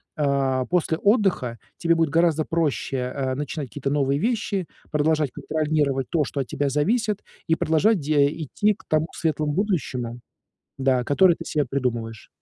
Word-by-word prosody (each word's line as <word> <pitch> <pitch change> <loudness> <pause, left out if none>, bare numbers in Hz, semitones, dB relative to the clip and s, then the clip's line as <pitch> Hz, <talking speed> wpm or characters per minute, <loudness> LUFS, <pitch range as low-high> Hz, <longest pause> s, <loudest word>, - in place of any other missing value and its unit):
а, 135 -3 +1
после 170 -2 0
отдыха 195 - +1 0.2
тебе 170 0 +2
будет 165 -2 +2
гораздо 160 -1 +2
проще, 150 -5 -1 0.2
а, 130 -2 -1
начинать 145 -1 -4
какие-то 140 +1 -3
новые 140 -1 +1
вещи, 205 -5 -1 0.2
продолжать 150 -2 +1
контролировать 150 -4 -1
то, 165 -4 +2
что 140 - -4
от 125 - -5
тебя 140 0 -1
зависит, 210 - +1 0.3
и 160 - +3
продолжать 170 +7 +2
де 145 -1 +3 0.2
идти 210 +9 +1
к - - -19
тому 155 +1 +1
светлым 155 -2 0
будущему, 130 - -2 0.6
да, 130 -2 +2
которое 170 +6 +4
ты - - -9
себе 150 -2 0
придумываешь. 115 -5 -3
150 Hz, 155 wpm, -24 LUFS, 135-165 Hz, 0.6 s, которое